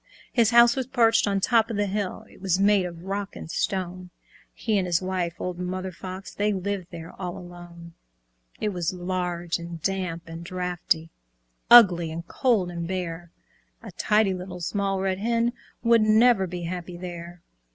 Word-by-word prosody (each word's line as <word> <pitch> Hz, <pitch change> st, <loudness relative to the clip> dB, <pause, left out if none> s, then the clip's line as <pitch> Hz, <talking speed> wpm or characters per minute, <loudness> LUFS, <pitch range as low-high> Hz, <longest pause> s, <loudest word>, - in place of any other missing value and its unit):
His 230 Hz, -3 st, +4 dB
house 235 Hz, 0 st, +6 dB
was 260 Hz, -2 st, -2 dB
perched 230 Hz, -4 st, +3 dB
on 200 Hz, -1 st, +1 dB
top 225 Hz, +2 st, +3 dB
of 225 Hz, -, -3 dB
the 205 Hz, -, +2 dB
hill, 200 Hz, -1 st, -3 dB
It -, -, -18 dB
was 190 Hz, -1 st, +1 dB
made 200 Hz, -2 st, +4 dB
of 170 Hz, -1 st, -10 dB
rock 200 Hz, +1 st, -4 dB
and 160 Hz, -, -8 dB
stone; 185 Hz, -1 st, -2 dB, 0.4 s
He 215 Hz, -4 st, 0 dB
and 185 Hz, -, -1 dB
his 170 Hz, -1 st, +2 dB
wife, 185 Hz, -2 st, -2 dB
old 180 Hz, -1 st, -4 dB
Mother 185 Hz, +1 st, -3 dB
Fox, 185 Hz, +2 st, -8 dB
They 210 Hz, +1 st, +1 dB
lived 195 Hz, -1 st, -3 dB
there 165 Hz, -1 st, -9 dB
all 180 Hz, -1 st, -4 dB
alone. 175 Hz, -1 st, -11 dB, 0.7 s
It 210 Hz, -, 0 dB
was 180 Hz, -2 st, -2 dB
large 175 Hz, -2 st, -2 dB
and 170 Hz, 0 st, -7 dB
damp 185 Hz, -4 st, -2 dB
and 165 Hz, +1 st, -8 dB
draughty, 175 Hz, -2 st, -2 dB, 0.6 s
Ugly 180 Hz, -9 st, +8 dB
and 170 Hz, +1 st, -6 dB
cold 220 Hz, -9 st, +1 dB
and 170 Hz, -1 st, -4 dB
bare; 175 Hz, -2 st, -4 dB, 0.5 s
A -, -, -8 dB
tidy 210 Hz, -2 st, +2 dB
Little 180 Hz, 0 st, -7 dB
Small 195 Hz, +2 st, -1 dB
Red 190 Hz, 0 st, -1 dB
Hen 235 Hz, +2 st, +1 dB, 0.3 s
Would 230 Hz, -1 st, +5 dB
never 215 Hz, -2 st, +4 dB
be 175 Hz, 0 st, -6 dB
happy 175 Hz, 0 st, -5 dB
there. 175 Hz, -1 st, -8 dB
185 Hz, 170 wpm, -25 LUFS, 175-205 Hz, 0.7 s, Ugly